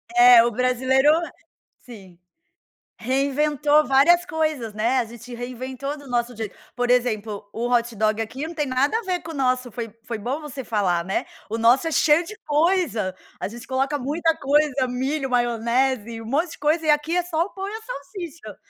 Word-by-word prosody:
É, 240 -1 +8
o 235 - +1
brasileiro 255 +4 +2 0.7
sim. 195 -8 -14 0.8
Reinventou 290 +4 +2
várias 320 +6 +5
coisas, 310 -8 -2
né? 230 +5 +1
A 240 - -1
gente 240 +2 -11
reinventou 255 +4 -5
do 285 - -13
nosso 245 0 -1
jeito. 220 -2 -6 0.2
Por 245 0 -1
exemplo, 215 -5 0
o 235 +2 -2
hot 235 -1 +1
dog 215 +1 +1
aqui 260 +7 -5
não 335 - -8
tem 295 -2 -1
nada 270 - +1
a - - -5
ver 365 -3 -2
com 325 - -8
o - - -10
nosso. 255 -2 0
Foi 230 -1 -6
foi 230 -1 -5
bom 250 +8 -3
você 275 -3 -7
falar, 185 -7 0
né? 190 - -2 0.2
O 225 - -2
nosso 240 +7 +4
é 325 - -1
cheio 310 +4 +4
de 425 - -9
coisa, 295 - +1 0.2
a - - -3
gente 235 +2 -10
coloca 270 +2 0
muita 320 +5 0
coisa, 280 -1 +2
milho, 270 +3 -2
maionese, 240 -1 0
um - - -11
monte 305 +7 0
de - - -11
coisa 310 +2 +1
e 305 - +5
aqui 295 +3 +1
é - - +2
só 340 -1 0
o 395 - -9
pão 390 0 -6
e - - -5
a 440 +1 -6
salsicha, 340 - -8
260 Hz, 195 wpm, -23 LUFS, 235-300 Hz, 0.8 s, É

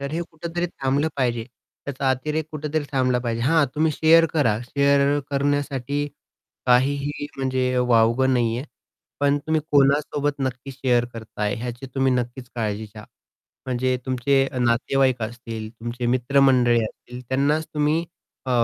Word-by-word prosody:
तर 140 0 -4
हे 165 - -1
कुठेतरी 170 +2 -3
थांबलं 140 -1 -1
पाहिजे. 120 -4 0 0.4
त्याचा 135 -1 -1
अतिरेक 150 +4 -1
कुठेतरी 155 0 -2
थांबला 130 -2 +2
पाहिजे. 115 -2 -2
हा 160 +3 +4
तुम्ही 155 +1 +2
शेअर 165 +2 +5
करा 120 -10 +2
शेअर 140 +2 +2
करण्यासाठी 145 0 -1 0.6
काहीही 140 +3 +2
म्हणजे 130 -1 0
वावगं 125 +2 +3
नाहीये. 120 +1 0 0.6
पण 145 0 +3
तुम्ही 160 0 +2
कोणासोबत 145 +1 +2
नक्की 130 0 -3
शेअर 125 -2 +1
करताय 105 -2 -3
ह्याची 120 +2 -6
तुम्ही 135 -1 +2
नक्कीच 125 0 -3
काळजी 110 -2 -2
घ्या. 105 0 -12 0.6
म्हणजे 130 0 0
तुमचे 135 +1 +2
नातेवाईक 125 +1 +2
असतील, 115 -1 -6
तुमचे 120 +2 -5
मित्रमंडळी 125 -1 +3
असतील 125 +3 -9
त्यांनाच 145 +4 +1
तुम्ही 150 +2 +1 0.4
अ, - - -2
130 Hz, 130 wpm, -23 LUFS, 120-145 Hz, 0.6 s, शेअर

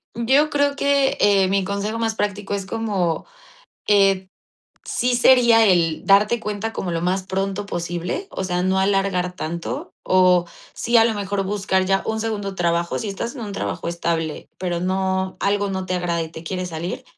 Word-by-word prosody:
Yo 265 +6 +3
creo 285 -1 +1
que, 280 -1 +2
eh, 195 -2 +4
mi 195 0 +1
consejo 200 +3 -3
más 225 -1 0
práctico 205 -1 -3
es 200 -1 -2
como, 195 -7 -1 0.6
eh, 195 -2 +3 0.6
sí 250 0 0
sería 235 -2 +6
el 170 -4 +2
darte 210 +4 +4
cuenta 210 0 -4
como 180 -5 -3
lo 165 - -1
más 185 +2 0
pronto 195 +1 -2
posible, 175 - -4
o 190 - -4
sea, 180 -1 -1
no 190 +1 +1
alargar 190 -2 +1
tanto, 170 -1 -5
o 185 -1 +4 0.3
sí, 235 +1 +1
a 225 - +7
lo 225 -1 +1
mejor, 200 -1 -2
buscar 190 -1 0
ya 195 +1 +1
un 220 0 -1
segundo 205 -3 -3
trabajo, 170 -1 0
si 220 - -4
estás 200 +6 -4
en 265 - -8
un 215 -3 -5
trabajo 195 - -3
estable, 170 -2 -2
pero 175 -2 -2
no, 190 0 -1
algo 205 0 +1
no 190 -1 -3
te 185 0 -2
agrada 175 -2 -1
y 160 - -5
te 160 0 -10
quiere 185 +2 -3
salir, 175 +8 -5
195 Hz, 180 wpm, -21 LUFS, 180-215 Hz, 0.6 s, a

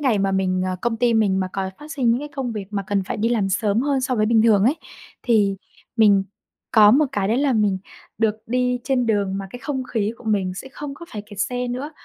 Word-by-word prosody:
ngày 255 -7 +2
mà 195 0 +1
mình 185 -1 0
ờ, 185 0 -2
công 235 -1 0
ty 235 0 +2
mình 200 -4 +2
mà 185 - -1
có 190 -1 -3
phát 300 +1 -9
sinh 255 -6 +1
những 235 - +2
cái 295 - -6
công 270 -4 -4
việc 205 -3 -5
mà 200 -2 -2
cần 200 0 0
phải - - -4
đi 220 +2 +1
làm 220 -5 +1
sớm 205 +2 +1
hơn 275 0 +1
so 255 0 -1
với 215 -2 +1
bình 225 0 +4
thường 210 -3 +4
ấy, 270 +7 +3 0.5
thì 205 -5 +2 0.4
mình 205 -4 +5 0.5
có 210 -2 +7
một 290 +6 +4
cái 195 -1 0
đấy 225 - +2
là 280 -1 +2
mình 210 -4 +1 0.4
được 220 -1 +2
đi 250 +1 0
trên 255 -3 +1
đường 200 -3 0
mà 195 - -5
cái 245 - -8
không 265 -1 -3
khí 220 -3 -1
của 240 - -16
mình 195 -4 0
sẽ 265 - -8
không 290 0 -6
có 340 - -11
phải 210 - -5
kẹt 205 -2 -8
xe 250 +2 -1
nữa. 255 +5 -4
220 Hz, 260 wpm, -22 LUFS, 200-250 Hz, 0.5 s, có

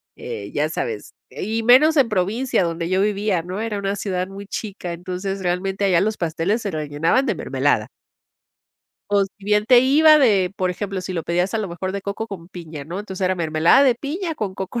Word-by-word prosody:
eh, 100 0 -7
ya 150 +1 0
sabes, 115 -8 -4 0.2
y 225 +3 -3
menos 300 +7 +6
en 270 -4 +5
provincia 210 +3 0
donde 165 0 -2
yo 190 +1 +2
vivía, 205 -4 0
¿no? 185 +3 -5
Era 220 -2 -2
una 200 0 -2
ciudad 185 -2 -2
muy 195 +1 -9
chica, 195 -4 -5
entonces, 185 +3 -5
realmente, 190 +2 -1
allá 180 -3 +4
los 215 +1 0
pasteles 170 +7 -1
se 200 - -2
rellenaban 155 - 0
de - - 0
mermelada. - - 0 1.2
O 200 -1 +3
si 195 +1 -14
bien 210 +1 +2
te 250 -1 +7
iba 305 +4 +6
de, 200 -8 +3
por 185 -1 0
ejemplo, 195 +1 -4
si 185 0 -5
lo 165 - -2
pedías 175 +5 -1
a - - +1
lo 205 -4 -3
mejor 185 +2 -4
de 200 -1 -4
coco 205 +2 -4
con 180 -5 -9
piña, 160 -6 -8
¿no? 175 +5 -6
Entonces, 190 -2 -4
era 185 0 +1
mermelada 165 - +4
de 255 - +4
piña 320 +7 -4
con 195 -7 -4
coco 195 +5 -4
195 Hz, 205 wpm, -21 LUFS, 175-215 Hz, 1.2 s, te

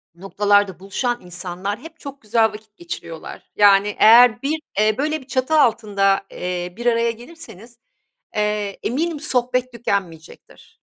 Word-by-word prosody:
noktalarda 200 0 +1
buluşan 240 +6 -3
insanlar 180 +4 -5
hep 320 +3 -13
çok 280 -1 -10
güzel 225 +1 +1
vakit 215 -1 -7
geçiriyorlar. 165 -1 -9
Yani, 205 0 +4
eğer 235 +1 +7
bir, 305 +3 -1 0.2
eee, 215 0 +3
böyle 305 +2 -1
bir 260 - -17
çatı 260 +2 -1
altında, 200 -5 +1
eee, 180 0 -4
bir 240 - -7
araya 235 -1 +2
gelirseniz, 235 - -13 0.6
eee, 210 -1 -2
eminim 310 +6 -2
sohbet 250 -1 -1
tükenmeyecektir. 190 -8 -6
215 Hz, 130 wpm, -20 LUFS, 195-245 Hz, 0.6 s, eğer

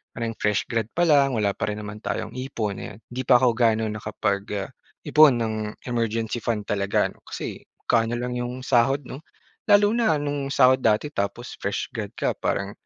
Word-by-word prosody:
parang 115 -1 -2
fresh 105 -2 +1
grad 115 -2 0
pa 175 - +3
lang, 140 -5 +4
wala 100 -2 +2
pa - - -3
rin 105 - -2
naman 105 +1 -7
tayong 110 - -3
ipon, 110 -6 -3
ayan. 105 - -8
'Di 130 +1 -3
pa 125 - +7
ako 125 -1 +4
ga'no 110 -1 +2
nakapag, 105 -1 -2 0.2
ah, - - -12 0.4
ipon 150 -3 +6
ng 110 -1 -1 0.3
emergency 115 -1 -1
fund 110 -3 -1
talaga, 100 0 0
'no? - - -25
Kasi - - -5 0.3
magkano 115 0 +2
lang 125 0 -3
'yong 125 +1 -5
sahod, 135 +3 +3
'no? 130 - -8 0.5
Lalo 205 +1 +6
na 225 -8 +2
no'ng 145 -1 -2
sahod 130 -1 +5
dati 110 +7 +2
tapos 100 +5 -3
fresh - - -2
grad - - -4
ka - - +1
parang 100 +1 -1
120 Hz, 185 wpm, -24 LUFS, 105-135 Hz, 0.5 s, pa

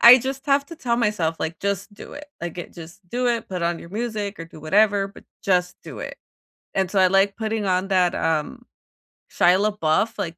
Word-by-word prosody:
I 245 +2 +10
just 265 +3 -5
have 280 0 +3
to 335 - -10
tell 235 -6 0
myself, 210 -8 0
like, 160 0 -3
"Just 200 +1 -2
do - - -11
it." 295 +1 -9
Like, 175 0 -5
it 175 - -7
"Just 170 +1 -11
do 245 +3 -1
it. 230 -2 0
Put 180 -2 -4
on 170 0 0
your 170 - -11
music 215 -3 -3
or 165 - -6
do 160 -1 -14
whatever, 200 +4 +3
but 200 - -15 0.2
just 180 -2 +1
do - - -9
it." - - -6 0.6
And 190 -2 0
so, 195 - +2
I 185 - +6
like 195 +1 +3
putting 220 -2 -2
on 185 +1 +1
that, 185 -1 +3
um, 155 -2 -1 0.7
Shia 180 +2 +4
LaBeouf, 210 +1 +1
like, 170 +1 -4
195 Hz, 215 wpm, -23 LUFS, 175-225 Hz, 0.7 s, I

